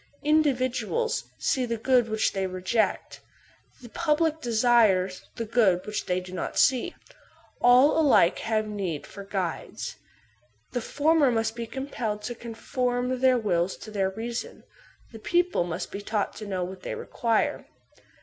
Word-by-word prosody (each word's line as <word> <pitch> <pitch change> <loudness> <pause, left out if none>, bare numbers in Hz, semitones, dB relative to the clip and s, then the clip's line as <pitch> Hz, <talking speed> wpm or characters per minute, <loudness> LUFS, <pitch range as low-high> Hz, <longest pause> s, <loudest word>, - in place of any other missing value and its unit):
Individuals 295 - +1
see 260 - 0
the 235 -1 -2
good 245 0 +2
which 220 0 +1
they 195 -1 -1
reject; 185 +5 -1 0.6
the 240 - -10
public 320 +2 0
desire 225 -5 +3 0.2
the 230 - -3
good 210 -6 +2
which 210 0 -4
they 180 0 +1
do 180 0 -10
not - - -4
see. 255 -2 +3 0.7
All 255 +6 +6
alike 260 - +4
have 220 -1 0
need 190 -8 -4
of 200 -1 -9
guides. 185 -5 -4 0.7
The 245 - -2
former 295 +3 +3
must 225 -1 0
be 235 -1 -5
compelled 230 -5 -4
to 240 - -3
conform 245 +2 -2
their 255 -1 +4
wills 185 -5 0
to 215 - -10
their 195 -2 0
reason; 230 +4 -6 0.5
the 225 - -10
people 350 - +1
must 170 -2 -5
be 200 - -5
taught 210 0 -2
to 215 - -7
know 185 -2 -2
what 185 +1 -7
they - - -4
require. 230 -2 -1
230 Hz, 150 wpm, -26 LUFS, 200-255 Hz, 0.7 s, All